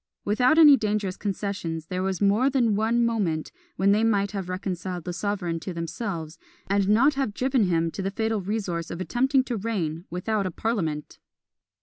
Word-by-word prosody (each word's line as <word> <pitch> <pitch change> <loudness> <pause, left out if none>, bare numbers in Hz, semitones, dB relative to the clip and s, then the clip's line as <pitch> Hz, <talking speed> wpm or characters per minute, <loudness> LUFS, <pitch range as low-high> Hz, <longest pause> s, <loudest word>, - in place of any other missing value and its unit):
Without 250 +8 +3
any 300 -3 +9
dangerous 210 -4 -1
concessions, 195 -6 -3
there 180 +2 -3
was 190 -1 -1
more 210 +7 +3
than 240 -6 +2
one 230 +3 +2
moment 190 -9 -1 0.2
when 195 +2 +3
they 210 +2 +3
might 200 -3 +2
have 195 -3 -5
reconciled 185 -1 -4
the 175 - -4
sovereign 190 -3 -2
to 180 +2 -6
themselves, 165 -2 -5 0.3
and 200 0 +1
not 250 +8 +5
have 270 -7 -2
driven 255 -4 +2
him 165 -2 +1
to 195 - -5
the 195 - -1
fatal 220 +1 -1
resource 185 -4 -3
of 170 - -6
attempting 260 +7 +2
to 245 -3 -3
reign 180 -6 -3
without 195 +3 -1
a - - -4
parliament! 165 -8 -3
200 Hz, 180 wpm, -25 LUFS, 180-225 Hz, 0.3 s, any